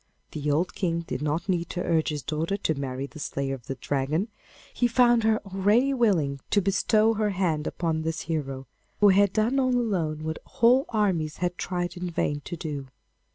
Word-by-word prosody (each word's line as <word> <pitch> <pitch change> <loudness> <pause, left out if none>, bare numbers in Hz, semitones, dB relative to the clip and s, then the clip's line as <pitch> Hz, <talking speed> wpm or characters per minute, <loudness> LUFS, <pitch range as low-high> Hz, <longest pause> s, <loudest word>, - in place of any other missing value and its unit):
The 150 -1 -3
old 160 +5 +1
King 170 -3 -1
did 165 -5 -5
not 155 +4 -1
need 175 -3 0
to 180 - -3
urge 160 -2 +1
his 150 -3 -4
daughter 160 +6 -1
to 175 -5 0
marry 135 -2 -4
the 155 +2 -11
slayer 140 -1 -2
of 125 -3 -9
the 135 - -3
Dragon; 145 - -1 0.4
he 245 - +2
found 240 -1 +4
her 220 0 +3
already 205 +8 +2
willing 175 - +2
to 205 - +3
bestow 215 +3 +3
her 215 -1 0
hand 175 -6 0
upon 160 -2 -1
this 160 0 -2
hero, 135 -5 -3 0.3
who 205 - +7
had 200 0 +5
done 225 +6 +1
all 255 -1 +2
alone 170 -10 -1
what 160 0 -3
whole 250 +5 +3
armies 185 -9 0
had 180 0 -1
tried 175 0 -3
in 180 0 -3
vain 145 -3 -1
to 175 - -5
do. 145 -5 -5
175 Hz, 195 wpm, -26 LUFS, 150-210 Hz, 0.4 s, who